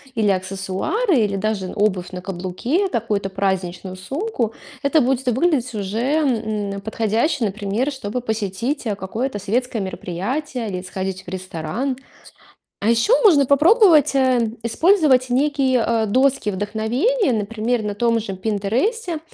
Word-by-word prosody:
или 215 -3 +2
аксессуары, 195 - 0
или 205 -3 +1
даже 195 -2 -2
обувь 195 -4 0
на 180 - -5
каблуке, 190 - -1
какую-то 215 - -1
праздничную 190 -1 -2
сумку, 260 - -3 0.3
это 295 +2 +3
будет 260 +1 0
выглядеть 255 -1 +1
уже, 205 +2 -3
м, 220 -8 0
подходяще, 225 +5 0
например, 210 +6 -1
чтобы 250 -3 -4
посетить, 220 +4 -2
э, 210 - -1
какое-то 205 +5 -3
светское 230 +3 -1
мероприятие 220 - -4
или 185 -2 -4
сходить 190 0 -5
в - - -32
ресторан. 185 - -3 0.8
А 215 - +2
еще 235 - +4
можно 295 -9 +6
попробовать, 315 - +5
э, 255 -4 +2
использовать 265 - +3
некие, 265 -1 +2
э, 230 -1 +1
доски 255 0 +2
вдохновения, 225 - 0
например, 225 +2 -1
на 210 -1 -3
том 230 +2 +1
же 195 -3 -5
"Пинтересте" 240 - -1
225 Hz, 130 wpm, -21 LUFS, 195-270 Hz, 0.8 s, можно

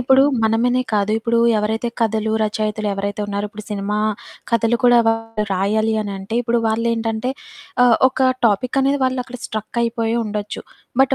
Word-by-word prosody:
ఇప్పుడు 265 +2 +5 0.2
మనమనే 240 +3 +2
కాదు. 210 0 +1
ఇప్పుడు 235 0 0 0.2
ఎవరైతే 220 +3 -1
కథలు, 220 -1 0
రచయితలు 215 0 -1
ఎవరైతే 200 +1 -3
ఉన్నారో 205 0 -2
ఇప్పుడు 215 -1 -9
సినిమా 205 +1 -2 0.5
కథలు 230 +1 +2
కూడా 245 -1 +6
వాళ్ళు 225 -1 -1
రాయాలి 215 +4 +1
అనంటే 200 +1 -6
ఇప్పుడు 235 0 +1
వాళ్ళేంటంటే 225 +2 -1 0.5
ఆహ్, 240 -2 +5
ఒక 260 0 +1 0.2
టాపికనేది 270 +6 +1
వాళ్ళక్కడ 255 -1 -2
స్ట్రక్ 215 +2 -5
అయిపోయి 230 0 -1
ఉండొచ్చు. 210 -1 -4 0.4
బట్ 270 0 +2
225 Hz, 140 wpm, -20 LUFS, 210-240 Hz, 0.5 s, కూడా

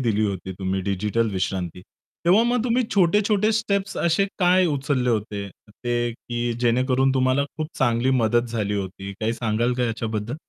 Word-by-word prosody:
दिली 110 -4 +1
होती 95 -1 -4
तुम्ही 95 0 -1
डिजिटल 105 +4 0
विश्रांती. 90 -2 -3 0.4
तेव्हा 185 +6 +5
मग 240 0 +1
तुम्ही 250 +1 +2
छोटे-छोटे 205 +3 +3
स्टेप्स 200 -3 -1
असे 170 +3 +2
काय 185 0 +4
उचलले 140 -4 0
होते 105 -2 -2 0.2
ते 120 +2 -2
की 120 +1 -3
जेणेकरून 130 +2 +2
तुम्हाला 130 +1 +2
खूप 155 - -2
चांगली 120 0 +2
मदत 120 +2 +2
झाली 105 -3 -2
होती? 95 0 -5
काही 110 +1 0
सांगाल 115 +1 0
का 125 - +2
याच्याबद्दल? 115 -1 -3
120 Hz, 155 wpm, -23 LUFS, 105-155 Hz, 0.4 s, तेव्हा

